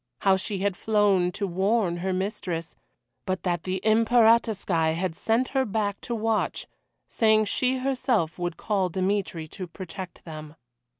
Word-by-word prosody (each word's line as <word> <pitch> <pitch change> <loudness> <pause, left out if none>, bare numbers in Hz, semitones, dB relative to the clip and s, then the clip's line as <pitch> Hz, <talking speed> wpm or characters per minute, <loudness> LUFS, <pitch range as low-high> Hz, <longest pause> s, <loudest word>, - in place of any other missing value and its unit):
How 195 -1 +5
she 195 +1 -3
had 195 0 0
flown 200 -4 +2
to 200 - -2
warn 190 0 +1
her 190 +2 -2
mistress, 185 -3 -3 0.5
but 185 0 -2
that 175 -3 -1
the 185 0 -1
Imperatorskoye 220 -7 +3
had 175 -1 -2
sent 230 +7 +1
her 270 -1 +1
back 205 -2 -2
to 235 - -3
watch, 225 0 -1 0.4
saying 220 -1 +3
she 255 +5 +1
herself 255 - 0
would 175 -2 -3
call 195 -4 0
Dmitry 185 -3 -1
to 185 +1 -7
protect 185 +1 -9
them. 155 -2 -9
195 Hz, 145 wpm, -26 LUFS, 180-220 Hz, 0.5 s, How